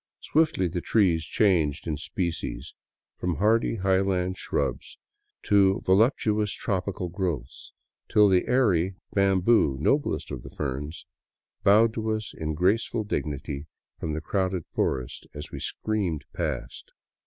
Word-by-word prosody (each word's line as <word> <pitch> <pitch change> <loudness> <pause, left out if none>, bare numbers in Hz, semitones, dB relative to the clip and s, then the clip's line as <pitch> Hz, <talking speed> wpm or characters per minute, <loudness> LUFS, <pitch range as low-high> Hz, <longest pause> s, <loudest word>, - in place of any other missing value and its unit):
Swiftly 155 - +2
the 85 +1 -3
trees 90 -7 +2
changed 80 -5 +1
in 80 -3 -1
species, 85 +3 -4 0.2
— - - -67
from 90 -1 -1
hardy 110 +6 +2
highland 95 -2 +1
shrubs - - -3 0.5
to 100 -2 +4
voluptuous 105 0 +3
tropical 95 -3 -2
growths, 85 -8 -4 0.4
till 105 -1 +6
the 95 -2 +3
airy 95 -8 +2 0.2
bamboo, 95 - +3
noblest 140 - 0
of 65 -3 -6
ferns, 75 +2 -4 0.6
bowed 110 +2 +5
to 110 -1 -3
us 110 -1 -2
in 80 -1 -3
graceful 105 +6 +1
dignity 75 -6 -4 0.3
from 80 - -3
the 80 - -3
crowded 95 0 -1
forest 65 -2 -2
as 75 - -7
we - - -6
screamed 95 -9 -2
past. - - -4
95 Hz, 125 wpm, -26 LUFS, 80-105 Hz, 0.6 s, till